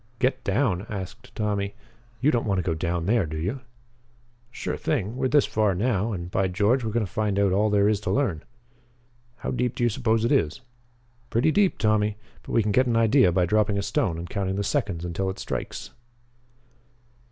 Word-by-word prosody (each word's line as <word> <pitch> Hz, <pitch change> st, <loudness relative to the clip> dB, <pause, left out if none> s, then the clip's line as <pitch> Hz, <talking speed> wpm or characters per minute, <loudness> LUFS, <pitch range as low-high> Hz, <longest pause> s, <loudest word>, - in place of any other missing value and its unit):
"Get 125 Hz, +2 st, 0 dB
down?" 100 Hz, -2 st, 0 dB
asked 100 Hz, +2 st, -7 dB
Tommy. 100 Hz, -2 st, -1 dB, 0.5 s
"You 145 Hz, +4 st, +4 dB
don't 115 Hz, -4 st, 0 dB
want 100 Hz, -2 st, +1 dB
to 90 Hz, -, 0 dB
go 85 Hz, -1 st, 0 dB
down 85 Hz, +1 st, -2 dB
there, 105 Hz, -3 st, +2 dB
do 80 Hz, +1 st, -5 dB
you?" 95 Hz, +12 st, -2 dB, 0.9 s
"Sure 120 Hz, -, -4 dB
thing. 115 Hz, -7 st, -2 dB
We're 130 Hz, 0 st, 0 dB
this 145 Hz, +2 st, +4 dB
far 105 Hz, -3 st, +1 dB
now 110 Hz, +1 st, 0 dB
and, 90 Hz, -3 st, -5 dB
by 95 Hz, 0 st, +1 dB
George, 105 Hz, +8 st, +2 dB
we're 110 Hz, -, -1 dB
going 110 Hz, 0 st, 0 dB
to 90 Hz, -, -11 dB
find 105 Hz, -1 st, 0 dB
out 100 Hz, -1 st, +3 dB
all 105 Hz, +3 st, +2 dB
there 100 Hz, -1 st, +3 dB
is 105 Hz, -2 st, +2 dB
to 105 Hz, -, -4 dB
learn." 110 Hz, -, 0 dB, 0.9 s
"How 120 Hz, -, -4 dB
deep 125 Hz, -1 st, -1 dB
do -, -, -1 dB
you 120 Hz, -, +4 dB
suppose 115 Hz, -1 st, +1 dB
it -, -, +1 dB
is?" 80 Hz, -, +1 dB, 0.7 s
"Pretty 130 Hz, +8 st, +2 dB
deep, 200 Hz, +1 st, +2 dB
Tommy. 105 Hz, -1 st, +1 dB, 0.2 s
But -, -, -8 dB
we 115 Hz, -, +4 dB
can 105 Hz, -, 0 dB
get 130 Hz, +5 st, +3 dB
an 115 Hz, -1 st, +2 dB
idea 115 Hz, -2 st, +5 dB
by 90 Hz, +1 st, +2 dB
dropping 105 Hz, +2 st, +2 dB
a 100 Hz, -, -1 dB
stone 85 Hz, -3 st, 0 dB
and 85 Hz, +1 st, -6 dB
counting 95 Hz, -1 st, -2 dB
the 100 Hz, -, -1 dB
seconds 100 Hz, -, -1 dB
until 90 Hz, +3 st, -2 dB
it 95 Hz, -, -5 dB
strikes." -, -, -5 dB
105 Hz, 205 wpm, -25 LUFS, 95-120 Hz, 0.9 s, idea